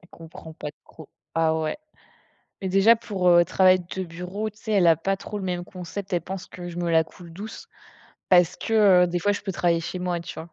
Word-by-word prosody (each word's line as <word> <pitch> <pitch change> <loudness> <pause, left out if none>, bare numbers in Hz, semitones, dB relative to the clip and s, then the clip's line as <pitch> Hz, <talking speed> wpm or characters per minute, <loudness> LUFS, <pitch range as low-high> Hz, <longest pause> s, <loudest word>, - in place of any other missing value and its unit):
Elle 175 - -21
comprend 160 -1 -12
pas 155 - -7 0.2
trop. 160 -3 -14 0.3
Ah 160 -1 +2
ouais, 155 -1 -2 0.9
mais 190 - -2
déjà 195 +5 +6
pour, 195 -5 -2
heu, 175 0 +6
travail 185 -1 +4
de 185 +1 -5
bureau, 180 +5 -5
tu 210 - -23
sais, 220 - -6
elle 185 -4 +4
a 165 - +6
pas 195 +5 -1
trop 210 - -7
le 200 - -5
même 180 -1 -2
concept, 185 +2 -8
elle 175 - +1
pense 185 +2 -7
que 175 -1 -9
je 170 - -8
me 175 -1 -1
la 160 -1 +4
coule 170 +1 -14
douce, 205 +6 -9 0.6
parce 180 -1 +4
que, 205 -5 +4
heu, - - +1
des 175 0 -2
fois 205 +4 +1
je 205 - -4
peux 195 - -3
travailler 170 -2 +1
chez 175 +2 -5
moi, 180 -1 -2
tu - - -8
vois?. 165 +1 -9
180 Hz, 240 wpm, -24 LUFS, 170-195 Hz, 0.9 s, déjà